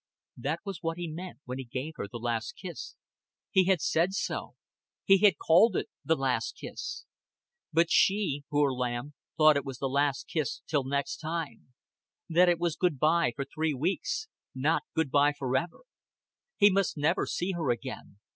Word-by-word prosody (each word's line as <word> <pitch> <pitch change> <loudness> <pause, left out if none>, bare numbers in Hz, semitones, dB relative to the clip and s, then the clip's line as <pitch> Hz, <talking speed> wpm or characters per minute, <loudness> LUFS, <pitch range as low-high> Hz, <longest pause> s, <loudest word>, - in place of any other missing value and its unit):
That 145 +7 -2
was 195 -4 -5
what 165 0 -2
he 175 -1 -4
meant 170 +1 -7
when 125 +1 -5
he - - -4
gave 130 +5 -5
her - - -4
the 110 - -7
last 115 -1 -2
kiss. 180 -2 -8 0.6
He 190 -3 +4
had 185 -3 +2
said 170 +4 +1
so. - - -3 0.5
He 195 0 +6
had 195 -6 +5
called 180 +6 +5
it - - -1
the 160 - +2
last 135 - -1
kiss. - - -6 0.7
But 165 +1 +3
she 190 -8 +3
poor 145 -1 +2
lamb 125 +2 -3 0.2
thought 155 -2 +6
it 140 - -1
was 135 -2 -6
the 135 - -3
last 140 +1 0
kiss 155 -7 -2
till 145 -4 0
next 140 +1 -1
time; 155 -6 -5 0.5
that 175 +2 +5
it 175 - +3
was 170 -2 -1
good 175 -6 +1
by 155 -1 +3
for 140 - -3
three 155 +1 -1
weeks, 180 - -1 0.3
not - - +1
good 160 -4 0
by 145 +1 +4
forever. 140 +4 -2 0.8
He 205 0 +6
must 195 -3 +1
never 155 +5 +1
see 180 +2 -1
her 165 -7 -2
again. 120 -4 -4
155 Hz, 175 wpm, -29 LUFS, 135-175 Hz, 0.8 s, He